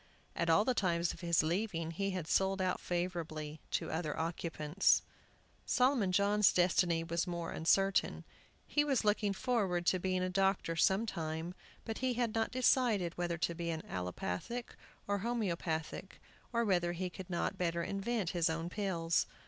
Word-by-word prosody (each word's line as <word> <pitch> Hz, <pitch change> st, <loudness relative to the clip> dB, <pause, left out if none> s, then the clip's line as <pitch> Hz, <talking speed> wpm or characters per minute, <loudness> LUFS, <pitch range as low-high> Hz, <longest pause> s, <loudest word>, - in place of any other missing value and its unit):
At 170 Hz, -, 0 dB
all 185 Hz, +6 st, +5 dB
the 255 Hz, -, +2 dB
times 175 Hz, -5 st, +1 dB
of -, -, -12 dB
his 170 Hz, -2 st, +3 dB
leaving 165 Hz, -1 st, -1 dB
he 195 Hz, +4 st, -1 dB
had 185 Hz, -4 st, -3 dB
sold 190 Hz, +2 st, +2 dB
out 185 Hz, -1 st, 0 dB
favorably 165 Hz, -4 st, -3 dB
to -, -, -2 dB
other 160 Hz, -2 st, -2 dB
occupants. 165 Hz, +1 st, +1 dB, 0.6 s
Solomon 250 Hz, -7 st, +2 dB
John's 200 Hz, +2 st, +4 dB
destiny 175 Hz, -2 st, +2 dB
was 170 Hz, +2 st, -1 dB
more 170 Hz, -1 st, -3 dB
uncertain. 195 Hz, +4 st, +2 dB, 0.4 s
He 295 Hz, -, +2 dB
was 275 Hz, -6 st, +1 dB
looking 210 Hz, -1 st, +2 dB
forward 195 Hz, -5 st, 0 dB
to 185 Hz, -, +3 dB
being 185 Hz, 0 st, 0 dB
a -, -, +1 dB
doctor 190 Hz, -3 st, +1 dB
some 190 Hz, +6 st, +3 dB
time, 165 Hz, -3 st, -4 dB, 0.3 s
but 225 Hz, -1 st, -4 dB
he 255 Hz, -1 st, 0 dB
had 235 Hz, -2 st, 0 dB
not 225 Hz, 0 st, +1 dB
decided 240 Hz, -8 st, +2 dB
whether 175 Hz, -1 st, -2 dB
to 170 Hz, +1 st, 0 dB
be 170 Hz, 0 st, -4 dB
allopathic 95 Hz, -, -4 dB, 0.3 s
or 205 Hz, 0 st, 0 dB
homeopathic, 185 Hz, -6 st, -3 dB, 0.3 s
or 235 Hz, -1 st, +1 dB
whether 175 Hz, -4 st, +2 dB
he 180 Hz, +1 st, -3 dB
could 190 Hz, 0 st, -9 dB
not 185 Hz, +2 st, -2 dB
better 170 Hz, -1 st, 0 dB
invent 200 Hz, -1 st, -1 dB
his 170 Hz, -3 st, +1 dB
own 165 Hz, +1 st, -2 dB
pills. 170 Hz, -5 st, 0 dB
180 Hz, 160 wpm, -34 LUFS, 170-205 Hz, 0.6 s, all